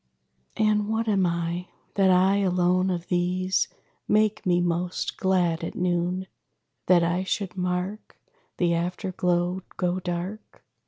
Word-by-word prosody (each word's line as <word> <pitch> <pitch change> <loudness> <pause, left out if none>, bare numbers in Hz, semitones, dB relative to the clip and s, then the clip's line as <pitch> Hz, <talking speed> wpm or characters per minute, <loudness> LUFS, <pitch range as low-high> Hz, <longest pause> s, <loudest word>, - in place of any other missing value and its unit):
And 210 -1 +2
what 225 +1 0
am 195 -4 +3
I? 170 +1 -2 0.3
That 195 -1 +3
I 185 +2 +4
alone 185 -1 +2
of 175 -2 -3
these 180 +1 +1 0.4
Make 215 -1 +2
me 175 -1 +3
most 175 +1 -1
glad 180 -3 +1
at - - -4
noon? 180 +1 0 0.6
That 175 -2 +5
I 175 +2 +1
should 190 -1 -3
mark 180 +3 -3 0.4
The 175 -1 +2
after 180 +3 -2
glow 180 +1 0 0.2
go 180 0 0
dark? 180 +4 -6
180 Hz, 130 wpm, -26 LUFS, 175-190 Hz, 0.6 s, That